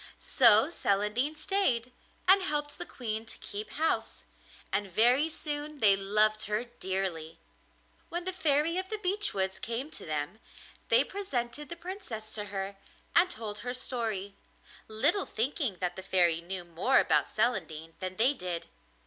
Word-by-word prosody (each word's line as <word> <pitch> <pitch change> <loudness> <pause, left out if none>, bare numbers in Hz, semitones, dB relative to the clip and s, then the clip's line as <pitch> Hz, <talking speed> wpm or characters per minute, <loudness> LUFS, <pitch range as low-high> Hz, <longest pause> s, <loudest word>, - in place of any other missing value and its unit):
So 230 -1 +5
Celandine 215 - 0
stayed, 300 - 0 0.4
and 385 +2 +7
helped 295 -4 -2
the - - -4
Queen 220 -3 -4
to - - -7
keep 210 +1 -7
house, 320 +2 -1 0.5
and 200 -2 -1
very 245 - +4
soon 300 -1 -4
they 205 -4 +6
loved 215 +2 +2
her 210 +3 -1
dearly. 190 -8 -4 0.7
When 345 +1 -3
the 375 +1 -1
Fairy 320 0 +2
of 375 0 -5
the 430 - -2
Beech 415 - 0
Woods 190 0 -1
came 240 +6 -3
to - - -8
them, 155 +6 -3 0.5
they - - +5
presented 290 -8 -4
the 340 - -5
Princess 340 - -7
to 210 -1 -5
her, 195 -1 -5 0.4
and 355 +2 +6
told 215 -11 -5
her 245 +1 -3
story, 220 -6 -2 0.5
little 270 - +1
thinking 255 - -1
that 180 -1 -2
the 190 - -6
Fairy 175 -3 +4
knew 180 +1 -3
more 175 +11 +2
about - - +3
Celandine 165 -8 -1
than 185 -1 -4
they 245 +7 +3
did. 180 -9 -5
225 Hz, 155 wpm, -30 LUFS, 195-295 Hz, 0.7 s, and